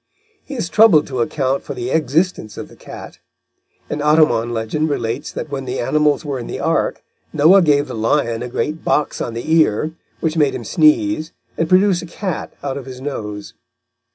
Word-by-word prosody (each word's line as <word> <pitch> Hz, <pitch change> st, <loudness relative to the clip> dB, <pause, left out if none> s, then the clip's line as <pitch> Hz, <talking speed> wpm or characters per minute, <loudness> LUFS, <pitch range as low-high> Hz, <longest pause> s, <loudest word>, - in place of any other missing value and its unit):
He 280 Hz, -, -8 dB
is 230 Hz, -9 st, -2 dB
troubled 185 Hz, -6 st, +5 dB
to 130 Hz, -3 st, -2 dB
account 135 Hz, +2 st, 0 dB
for 140 Hz, -, -7 dB
the 125 Hz, 0 st, -4 dB
existence 160 Hz, -, 0 dB
of -, -, -7 dB
the -, -, -15 dB
cat. -, -, -11 dB, 0.7 s
An 150 Hz, -, -3 dB
Ottoman 150 Hz, -7 st, +3 dB
legend 120 Hz, +8 st, -1 dB
relates 120 Hz, +1 st, -3 dB
that 150 Hz, -, -6 dB
when 135 Hz, -1 st, -4 dB
the -, -, -3 dB
animals 150 Hz, +3 st, +1 dB
were 140 Hz, -3 st, -3 dB
in 120 Hz, -, -7 dB
the -, -, -5 dB
Ark, 165 Hz, +3 st, 0 dB, 0.3 s
Noah 165 Hz, +6 st, +6 dB
gave 145 Hz, -3 st, +3 dB
the -, -, -7 dB
lion 115 Hz, +1 st, 0 dB
a 125 Hz, -, -4 dB
great 150 Hz, +7 st, -3 dB
box 150 Hz, -, 0 dB
on 115 Hz, -, -4 dB
the 120 Hz, +7 st, -2 dB
ear, 155 Hz, -2 st, +3 dB, 0.3 s
which 160 Hz, 0 st, -1 dB
made 145 Hz, -3 st, +2 dB
him -, -, -5 dB
sneeze, 310 Hz, -, +2 dB, 0.2 s
and 160 Hz, -, -1 dB
produce 185 Hz, -1 st, +4 dB
a 175 Hz, -, -8 dB
cat 185 Hz, 0 st, -4 dB
out 140 Hz, -1 st, -3 dB
his 130 Hz, 0 st, -9 dB
nose. 105 Hz, -7 st, -6 dB
145 Hz, 185 wpm, -19 LUFS, 125-160 Hz, 0.7 s, Noah